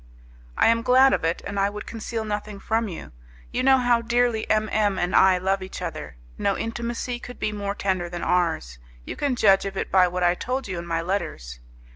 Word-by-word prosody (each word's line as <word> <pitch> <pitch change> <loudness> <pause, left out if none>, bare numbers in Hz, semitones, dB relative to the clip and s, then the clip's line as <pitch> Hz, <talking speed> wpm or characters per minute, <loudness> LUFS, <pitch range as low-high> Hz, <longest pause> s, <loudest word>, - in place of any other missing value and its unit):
"I - - +4
am 230 0 +3
glad 255 +2 +5
of - - 0
it, 165 +1 -1
and 200 0 -3
I 195 +1 +2
would 210 +1 -7
conceal 225 0 -5
nothing 210 -1 -4
from 225 +2 -1
you. 175 - -8 0.4
You 250 - -1
know 265 +1 +5
how 245 -2 +2
dearly 235 -1 0
M 215 0 +2
M 205 -3 +1
and 180 0 -1
I 190 -1 +6
love 190 +2 0
each 185 - -7
other. - - -6 0.2
No 200 - +1
intimacy 235 +1 -4
could 245 0 -10
be 215 - -1
more 200 -1 -3
tender 185 -4 -1
than 175 0 -5
ours; 160 - 0 0.3
you - - -6
can 280 -3 -1
judge 195 -4 +4
of 195 -1 -5
it - - -3
by 185 -1 +5
what 180 0 -2
I 175 0 +4
told 255 +7 -3
you 185 -3 -4
in 170 - -8
my 165 -1 -1
letters. 165 - -4
200 Hz, 220 wpm, -24 LUFS, 180-230 Hz, 0.4 s, I